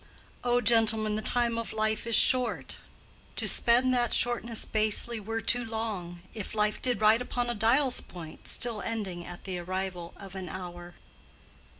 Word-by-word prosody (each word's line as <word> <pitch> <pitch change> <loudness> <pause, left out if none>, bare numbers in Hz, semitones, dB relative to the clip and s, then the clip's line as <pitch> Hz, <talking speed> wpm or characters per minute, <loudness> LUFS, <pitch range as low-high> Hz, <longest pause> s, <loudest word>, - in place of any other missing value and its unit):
"O 245 0 +2
gentlemen, 220 -1 +4
the 215 - -2
time 235 0 +1
of 230 - -5
life 215 +1 -1
is 230 - +3
short; 250 +1 +3 0.6
To - - -3
spend 250 +2 +3
that 240 -2 +1
shortness 235 -2 +1
basely 220 +2 0
were 225 +2 -4
too 245 +2 +2
long, 215 -6 -5
If 215 0 -6
life 210 0 0
did 245 -5 0
ride 215 +2 +5
upon 245 -1 -2
a - - -2
dial's 245 +4 +3
point, 165 -3 -11
Still 230 -4 0
ending 195 -6 -4
at 175 0 -10
the 185 -2 -4
arrival 180 -1 -5
of 195 -2 -11
an 190 -2 -7
hour." 175 -1 -8
220 Hz, 165 wpm, -28 LUFS, 190-235 Hz, 0.6 s, ride